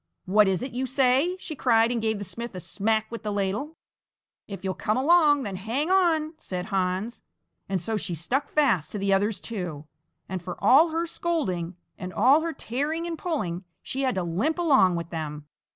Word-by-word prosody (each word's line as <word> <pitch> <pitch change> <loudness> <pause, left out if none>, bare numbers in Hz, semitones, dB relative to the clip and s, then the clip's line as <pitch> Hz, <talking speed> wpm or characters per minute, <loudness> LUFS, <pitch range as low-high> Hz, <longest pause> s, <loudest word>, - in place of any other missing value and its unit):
"What 205 +2 +4
is 190 +4 0
it 260 - -5
you 255 +3 -2
say!" 265 +7 +2
she 320 -4 -6
cried, 230 -3 +3
and 235 -2 -1
gave 220 -1 0
the 200 - -6
smith 235 +2 -6
a - - -4
smack 220 +4 -1
with 230 - -6
the 210 -1 -3
ladle. 205 +11 -2 0.7
"If 195 -2 -8
you'll 190 -1 -1
come 215 +4 -1
along, 295 0 +4
then 200 -4 -4
hang 245 - -1
on!" 330 -5 +3
said 180 -1 -5
Hans, 195 +2 -2 0.5
and 195 -1 0
so 215 +6 -2
she 180 -4 -3
stuck 250 - -1
fast 230 - +2
to - - -2
the 195 0 +1
others 200 +1 +1
too, 180 -10 -5 0.4
and 185 -1 -4
for 180 +1 -6
all 275 +11 +6
her 330 +1 -1
scolding 195 - -2 0.2
and 180 0 -5
all 255 - +5
her 330 +1 -2
tearing 305 +5 -3
and 340 -1 -3
pulling, 210 - -3 0.2
she 270 - -3
had 260 -5 +1
to 185 - -1
limp 200 - 0
along 270 - +4
with 170 -1 -5
them. 150 -3 -5
220 Hz, 200 wpm, -26 LUFS, 185-290 Hz, 0.7 s, all